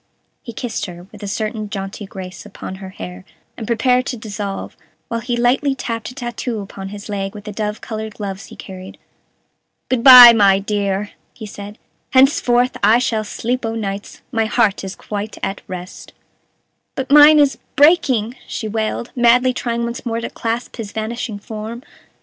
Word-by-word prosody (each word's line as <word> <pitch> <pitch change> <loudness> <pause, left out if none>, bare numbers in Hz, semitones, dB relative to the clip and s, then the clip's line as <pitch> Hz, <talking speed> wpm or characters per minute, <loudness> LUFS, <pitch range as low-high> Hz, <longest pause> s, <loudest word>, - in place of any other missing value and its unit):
He 235 - -8
kissed 230 -2 -4
her, 175 -1 -10
with - - -13
a 205 - -5
certain 215 +1 -3
jaunty 195 0 -6
grace, 190 -2 -9
upon 190 -2 -8
her 190 - -7
hair, 90 - -9 0.3
and 220 - -7
prepared 250 +2 +2
to 250 - -3
dissolve, 205 -2 -5 0.3
while 230 - -2
he 240 +1 -2
lightly 265 +3 +2
tapped 230 -3 -4
a 250 - -12
tattoo 240 -2 -4
upon 195 -1 -8
his 205 0 -9
leg 195 -1 -4
with 205 - -9
the 210 - -7
dove 210 0 -3
colored 220 -1 -6
gloves 195 -1 -6
he - - -12
carried. 185 -1 -10 0.9
"Good 245 -3 +1
by, 250 -3 +12
my 200 -3 +5
dear!" 200 0 -2 0.2
he 220 - -8
said; 205 +1 -9 0.4
"henceforth 255 -2 +3
I 215 +3 +5
shall 230 -3 0
sleep 245 +4 -3
o' 225 0 -2
nights; 200 -2 -5
my 225 -3 +1
heart 210 -2 +1
is 190 0 -6
quite 210 +1 -6
at 195 +1 -3
rest." 185 0 -8 0.8
"But 265 0 -4
mine 295 +1 +9
is 285 -2 +3 0.2
breaking," 270 -7 +4
she 220 - -4
wailed, 220 +2 -3
madly 250 +1 +4
trying 235 -1 -2
once 235 0 -4
more 230 -2 -2
to 230 - -5
clasp 230 +2 -4
his 215 -4 -6
vanishing 220 0 -4
form. 220 +3 -7
220 Hz, 175 wpm, -19 LUFS, 200-240 Hz, 0.9 s, by